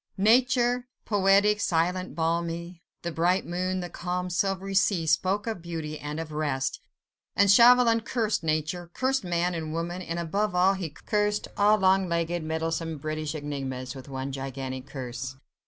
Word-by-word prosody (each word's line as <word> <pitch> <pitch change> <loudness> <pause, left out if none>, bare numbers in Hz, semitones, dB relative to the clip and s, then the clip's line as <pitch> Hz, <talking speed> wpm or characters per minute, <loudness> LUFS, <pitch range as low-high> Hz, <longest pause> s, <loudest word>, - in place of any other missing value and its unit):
Nature, 245 +3 +3 0.2
poetic, 205 0 +4
silent, 180 +2 0
balmy, 170 +1 -2 0.2
the 170 - -2
bright 175 +4 +1
moon, 185 +2 -2
the 175 - -4
calm, 180 +1 -3
silvery 195 +2 -1
sea 190 -3 +2
spoke 185 +6 +1
of 220 -6 -3
beauty 160 -3 -5
and 150 +2 -5
of 165 -1 -5
rest, 145 -3 -1 0.6
and 200 -1 +5
Chauvelin 235 +1 +6
cursed 225 -1 -1
nature, 155 +2 -1
cursed 265 -1 +1
man 175 0 0
and 160 -2 -4
woman, 170 +2 -3
and, 170 -2 -4
above 180 +4 -1
all, 185 +2 +4
he 185 -4 -4
cursed 210 +7 -1
all 210 +1 +4
long 190 -1 +3
legged, 170 0 -1
meddlesome 160 0 -2
British 155 +1 -4
enigmas 135 -4 -4
with 135 0 -10
one 135 0 -4
gigantic 135 -1 -5
curse. 130 -1 -6
170 Hz, 155 wpm, -27 LUFS, 155-195 Hz, 0.6 s, Chauvelin